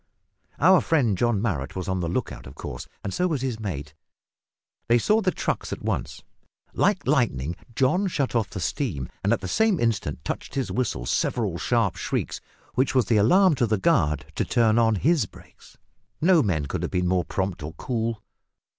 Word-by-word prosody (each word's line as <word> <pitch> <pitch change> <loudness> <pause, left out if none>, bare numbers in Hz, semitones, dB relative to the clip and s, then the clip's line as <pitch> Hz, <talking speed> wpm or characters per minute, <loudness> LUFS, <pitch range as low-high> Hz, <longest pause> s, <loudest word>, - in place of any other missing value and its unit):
Our 185 +3 +6
friend 130 -11 +2
John 115 +1 +1
Marrot 80 - -2
was 95 -1 -4
on 95 -1 -1
the 85 - -1
look - - -2
out - - -10
of 65 - -11
course, - - -7 0.2
and 100 - -4
so 180 - +1
was 150 -7 -2
his 125 -4 -2
mate. 75 -8 -5 0.9
They 120 - +5
saw 215 - +3
the 190 - +2
trucks - - -2
at - - -5
once. - - -3 0.5
Like - - +1
lightning 65 +6 +1 0.2
John 180 - +2
shut 140 -7 -1
off 115 -4 +1
the 95 - -6
steam 90 - -2
and 100 - +2
at 115 - +1
the 95 - -4
same 210 - +2
instant 110 -10 -1
touched - - -5
his 135 -2 -1
whistle 100 - -1
several 100 - 0
sharp 115 -7 +1
shrieks, - - -3 0.3
which 130 +1 +1
was 130 -4 +4
the 110 +1 +2
alarm 180 - +5
to 120 - +2
the 110 0 +1
guard 75 - +2
to - - 0
turn 115 -2 +3
on 115 -1 +3
his 150 - +2
brakes. - - -18 0.4
No 170 0 +5
men 85 - 0
could - - -3
have - - -2
been 90 0 0
more 90 0 +2
prompt 95 -3 -2
or 75 +2 -6
cool. 115 -1 -3
110 Hz, 195 wpm, -25 LUFS, 90-135 Hz, 0.9 s, Our